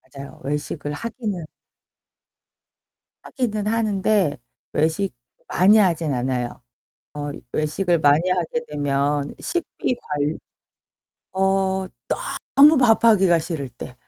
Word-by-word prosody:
맞아요. 140 0 -10
외식을 145 +1 -3
하기는 210 - -4 1.8
하기는 215 -5 -3
하는데 210 - +1 0.4
외식 160 +4 0 0.3
많이 200 +4 +5
하진 170 -7 +2
않아요. 125 -1 -2 0.5
어 145 -1 -4 0.2
외식을 170 +3 +1
많이 150 +4 +4
하게 185 +6 -1
되면 145 0 -1
식비 345 -7 -2
관 150 +1 -2 1.0
어 190 0 +1 0.7
너무 295 +2 +8
밥하기가 220 -7 +5
싫을 160 -4 -4
때. 125 +1 -10
175 Hz, 200 characters per minute, -22 LUFS, 145-210 Hz, 1.8 s, 너무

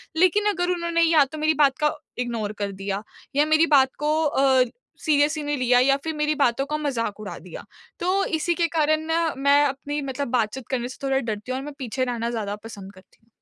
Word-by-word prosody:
लेकिन 370 +5 +3
अगर 355 -3 -1
उन्होंने 340 -1 0
या 325 -3 +5
तो 285 +3 -9
मेरी 310 +1 +2
बात 280 -3 +3
का 300 -1 +1 0.2
इग्नोर 230 -4 -2
कर 200 -1 -2
दिया 195 +1 -4 0.3
या 290 +1 +4
मेरी 310 +1 +4
बात 270 -4 +5
को 300 +1 +1
अ, 270 -3 +4 0.4
सीरियसली 300 0 +2
नहीं 290 0 -1
लिया 250 -1 +3
या 275 +2 +4
फिर 320 - -3
मेरी 300 0 0
बातों 270 -2 +1
का 300 +2 -2
मज़ाक 235 -8 -2
उड़ा 210 -1 -7
दिया। 175 0 -10 0.4
तो, 375 +3 +1
इसी 335 +2 0
के 340 0 +1
कारण 310 0 +2
ना, 325 0 0
मैं 280 +1 +4
अपनी 285 +2 -3
मतलब 275 0 -3
बातचीत 245 0 -1
करने 245 -2 -1
से 255 - -10
थोड़ा 270 -1 +1
डरती 220 -1 -4
हूँ 255 - -1
और 270 - -7
मैं 295 - -7
पीछे 255 0 -2
रहना 235 -2 -2
ज़्यादा 215 -4 -3
पसंद 200 -3 -10
करती 185 0 -20
हूँ। 225 - -34
275 Hz, 220 wpm, -24 LUFS, 240-310 Hz, 0.4 s, या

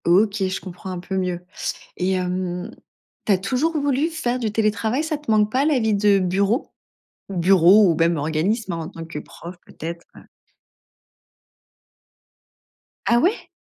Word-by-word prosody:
OK, 195 +4 +4
je 185 - -3
comprends 185 +1 -9
un 180 -1 -4
peu 190 +2 -5
mieux, 180 -2 -2 0.5
et 185 +1 0
hem, 180 0 -2 0.6
tu 210 - +4
as 190 - +3
toujours 255 - 0
voulu 285 +1 +1
faire 255 -7 -2
du 225 -4 -2
télétravail. 220 +5 0
Ça 315 -1 -2
te 295 - -22
manque 210 -1 +3
pas, 260 +4 +1
la 295 -4 +2
vie 220 -2 +1
de 200 -1 +4
bureau? 195 +6 0 0.6
Bureau, 190 +2 +5
ou - - +2
même 165 +1 +2
organisme, 175 +8 -1
en 165 -1 -5
tant 165 - -8
que 160 -2 -6
prof 175 +4 -11
peut-être, 170 +1 -7
heu? - - -15 2.8
Ah 235 0 +4
ouais? 365 - 0
195 Hz, 155 wpm, -22 LUFS, 180-230 Hz, 2.8 s, Bureau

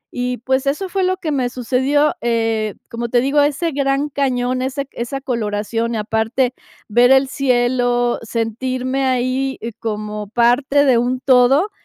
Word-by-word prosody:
Y, 250 0 -2
pues, 260 +3 -1
eso 335 +8 -1
fue 385 +1 -1
lo 370 0 +1
que 315 - -3
me 260 -4 0
sucedió, 265 +4 +1
eh, 225 -2 0 0.2
como 235 0 -4
te 240 - +3
digo, 275 +4 +2
ese 295 +4 0
Gran 280 +1 0
Cañón, 255 -2 -1
ese 270 +2 -3
esa 245 +3 -5
coloración, 230 -2 -2
y - - -1
aparte, 225 +4 0 0.3
ver 240 +3 +4
el 265 0 +5
cielo, 245 -2 +1
sentirme 255 +4 -2
ahí 260 +1 0
y 230 - -5
como 210 -1 -5
parte 245 +6 +2
de 255 -4 +4
un 250 +2 -1
todo, 265 +9 +4
250 Hz, 155 wpm, -19 LUFS, 235-275 Hz, 0.3 s, el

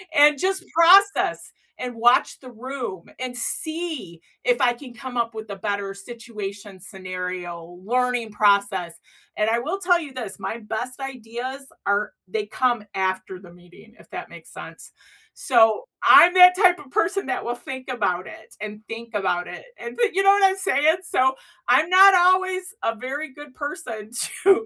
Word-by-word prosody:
and 295 -1 +6
just 380 +2 -1
process 380 +5 +4 0.3
and 250 -1 -5
watch 240 +2 +3
the 255 -2 -12
room 240 -6 -6 0.2
and 255 -1 -5
see 310 - -3 0.2
if - - +2
I 245 - +4
can 245 0 -12
come 255 0 -8
up 230 -1 -1
with 220 -1 -8
a 200 - -6
better 200 -1 -3
situation, 205 -2 -9
scenario, 180 -3 -7
learning 245 -1 0
process. 200 -4 +1 0.4
And 215 +1 +1
I 230 +1 +1
will 320 +11 -3
tell 355 -2 +3
you 295 -5 -9
this, 250 -6 -7
my 230 - -5
best 235 +4 -5
ideas 260 +1 -7 0.2
are 200 +1 0 0.2
they 210 +2 -2
come 235 +1 -1
after 185 0 -2
the 180 -2 -15
meeting, 180 +5 -19
if - - -19
that - - -7
makes - - -13
sense. - - -11 0.5
So, 225 -4 +3 0.2
I'm 350 +1 +8
that 360 0 +8
type 365 -2 +4
of 275 -6 -15
person 370 +8 0
that 380 0 -3
will 240 - -3
think 260 +1 -9
about 185 -7 -1
it, - - -13
and 210 0 -6
think 230 +1 -8
about 185 -3 -1
it, - - -9
and 470 - -8
thi 470 -3 +2
you 390 +2 +1
know 390 - +5
what 400 0 +5
I'm 380 0 +3
saying? 320 -4 +2
So, 265 -6 +1 0.3
I’m 315 - +4
not 385 +2 +8
always 370 +1 +3 0.2
a 225 - 0
very 270 +7 -5
good 290 -1 -13
person 225 -7 -7 0.3
to 390 - +8
245 Hz, 175 wpm, -23 LUFS, 205-315 Hz, 0.5 s, I'm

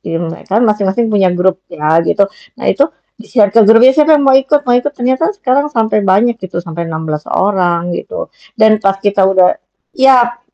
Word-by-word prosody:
di 165 - -5
me 165 -1 -7
kan 220 +5 +1
masing-masing 210 +1 -1
punya 195 -3 +2
grup 180 +1 -1
ya 155 +2 0
gitu. 200 +4 +1 0.3
Nah - - -9
itu, 280 +3 +1 0.3
di-share 210 -3 0
ke 230 - +4
grup, 225 +2 +6
siapa 305 +2 +3
yang 285 - -1
mau 270 - +4
ikut 270 +2 +2
ikut, 250 +4 0
ternyata 260 +5 -1
sekarang 280 -3 -1
sampai 220 -6 -1
banyak 210 +4 +1
gitu. 185 -2 -9
Sampai 170 0 -6
16 155 -1 -5
orang 175 -3 -1
gitu. - - -7 0.2
Dan 220 -1 +3
pas 195 -2 0
kita 195 -1 +1
udah 185 -1 +2 0.3
ya 245 -3 +2
210 Hz, 180 wpm, -13 LUFS, 185-250 Hz, 0.3 s, grup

